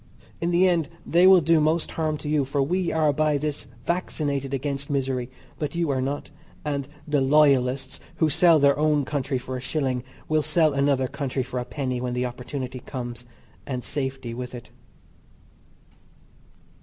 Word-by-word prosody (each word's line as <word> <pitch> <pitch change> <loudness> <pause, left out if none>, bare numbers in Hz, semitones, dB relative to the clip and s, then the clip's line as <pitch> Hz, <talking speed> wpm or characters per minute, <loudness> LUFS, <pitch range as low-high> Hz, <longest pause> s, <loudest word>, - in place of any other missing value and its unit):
In 170 - +1
the 175 +2 +4
end 170 -4 +1 0.2
they 175 +2 +5
will 190 -2 +8
do 165 +1 +4
most 155 +2 +1
harm 155 -2 -1
to 150 - -8
you 150 -1 +2
for 140 +2 -2
we 180 +4 0
are 155 -2 +2
by 155 0 +2
this 150 0 -4 0.2
vaccinated 145 -6 -1
against 140 +1 -3
misery 130 -3 -1 0.3
but 150 +1 -3
you 170 -3 +1
are 130 -1 0
not, 140 +3 -3 0.3
and 140 -2 -2 0.2
the 145 -2 +2
"loyalists" 135 -2 +3 0.2
who 160 - +2
sell 165 +2 +5
their 140 -1 +4
own 150 -2 +2
country 140 -1 -1
for 130 +1 -5
a - - -6
shilling 130 -2 -1 0.2
will 155 0 +2
sell 155 0 +2
another 140 -1 +2
country 130 -1 -2
for 125 0 -4
a 125 - -4
penny 130 -3 -3
when 125 -1 -2
the 125 0 0
opportunity 125 +1 -5
comes 120 -2 -7 0.4
and 125 -3 -3
safety 130 -4 -3
with 125 +1 -6
it. 120 - -10
140 Hz, 170 wpm, -25 LUFS, 130-155 Hz, 0.4 s, will